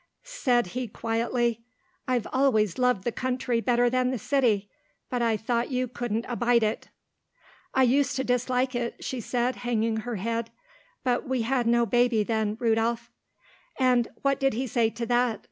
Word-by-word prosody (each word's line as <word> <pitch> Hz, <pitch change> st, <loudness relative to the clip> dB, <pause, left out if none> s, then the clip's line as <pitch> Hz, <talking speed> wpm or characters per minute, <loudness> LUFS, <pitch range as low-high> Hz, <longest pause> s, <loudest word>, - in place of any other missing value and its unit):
"Said 255 Hz, -, +1 dB
he 250 Hz, 0 st, -2 dB
quite 225 Hz, +2 st, -3 dB
quietly, 235 Hz, -1 st, 0 dB, 0.5 s
'I've 250 Hz, -4 st, 0 dB
always 245 Hz, -7 st, +2 dB
loved 250 Hz, -6 st, +2 dB
the 240 Hz, -, -1 dB
country 250 Hz, -1 st, -1 dB
better 245 Hz, 0 st, +2 dB
than 255 Hz, +1 st, +1 dB
the 255 Hz, -, -1 dB
city, 225 Hz, -5 st, +1 dB, 0.4 s
but 250 Hz, -1 st, -1 dB
I 230 Hz, -2 st, +2 dB
thought 235 Hz, +2 st, -1 dB
you 255 Hz, -1 st, -1 dB
couldn't 235 Hz, -2 st, -3 dB
abide 240 Hz, -1 st, +2 dB
it.' 215 Hz, +1 st, -1 dB, 0.9 s
"'I 265 Hz, -, +5 dB
used 265 Hz, +2 st, +2 dB
to 265 Hz, -, -1 dB
dislike 250 Hz, +1 st, 0 dB
it,' 240 Hz, -1 st, -3 dB
she 255 Hz, -2 st, -3 dB
said 245 Hz, +2 st, -1 dB
hanging 230 Hz, -2 st, 0 dB
her 235 Hz, +1 st, -4 dB
head, 230 Hz, +3 st, -2 dB, 0.5 s
'but 250 Hz, 0 st, 0 dB
we 255 Hz, -3 st, 0 dB
had 245 Hz, 0 st, 0 dB
no 235 Hz, 0 st, +3 dB
baby 240 Hz, -2 st, +2 dB
then, 220 Hz, -1 st, -1 dB
Rudolph.'" 230 Hz, 0 st, 0 dB, 0.7 s
"And 250 Hz, -3 st, +3 dB, 0.2 s
what 275 Hz, -1 st, +2 dB
did 270 Hz, -1 st, +2 dB
he 255 Hz, +3 st, -1 dB
say 235 Hz, -2 st, +1 dB
to 235 Hz, +1 st, -5 dB
that?" 240 Hz, -1 st, +1 dB
240 Hz, 170 wpm, -27 LUFS, 230-255 Hz, 0.9 s, I